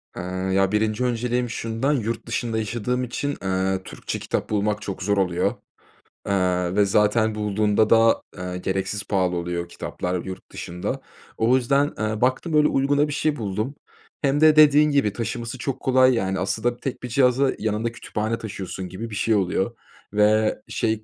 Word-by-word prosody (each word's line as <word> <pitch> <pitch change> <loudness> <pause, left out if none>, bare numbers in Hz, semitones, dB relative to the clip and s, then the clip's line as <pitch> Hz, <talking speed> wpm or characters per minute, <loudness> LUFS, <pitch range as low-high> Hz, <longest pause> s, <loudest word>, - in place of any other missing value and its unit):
Iıı, 95 +1 -3
ya, 95 0 +3
1'nci 110 +2 +1
önceliğim 125 0 0
şundan: 115 +5 -1
Yurt 115 -3 -2
dışında 115 -1 -2
yaşadığım 120 +3 -1
için, 140 +4 -3
ııı, 95 0 0
Türkçe - - -6
kitap - - -3
bulmak 105 0 0
çok 95 -1 -5
zor 100 0 +1
oluyor, 90 -2 +1 0.7
ııı, 90 -2 +1
ve 105 0 +4
zaten 105 +2 +2
bulduğumda 105 0 +1
da, 115 0 +5 0.2
ııı, 90 0 -4
gereksiz 95 +2 -2
pahalı 90 -3 0
oluyor, 85 0 -3
kitaplar 90 0 -4
yurt 95 -1 -8
dışında. 90 +1 -4 0.4
O 115 +3 +3
yüzden, 140 +3 +2
ııı, 110 0 -2
baktım 130 +6 +1
öyle 150 0 +5
uyguna 145 +2 +2
bir 145 - -4
şey 150 +1 0
buldum. 110 +3 -3 0.5
Hem 140 +1 +1
de 155 -1 +7
dediğin 150 0 +6
gibi 140 -8 +2
taşıması 115 +2 -4
çok 135 +1 -3
kolay, 130 0 +4
yani, 95 -5 -1
aslında 110 +6 -1
tek 130 0 -5
bir 125 - -4
cihaza 130 +1 +3
yanında 110 +2 -1
kütüphane 110 -1 -3
taşıyorsun 95 -3 -6
gibi 110 +6 -6
bir 105 - -6
şey 110 +2 +2
oluyor 95 +3 0 0.4
ve 105 +1 +3
şey, 110 -1 -1
110 Hz, 165 wpm, -23 LUFS, 95-125 Hz, 0.7 s, de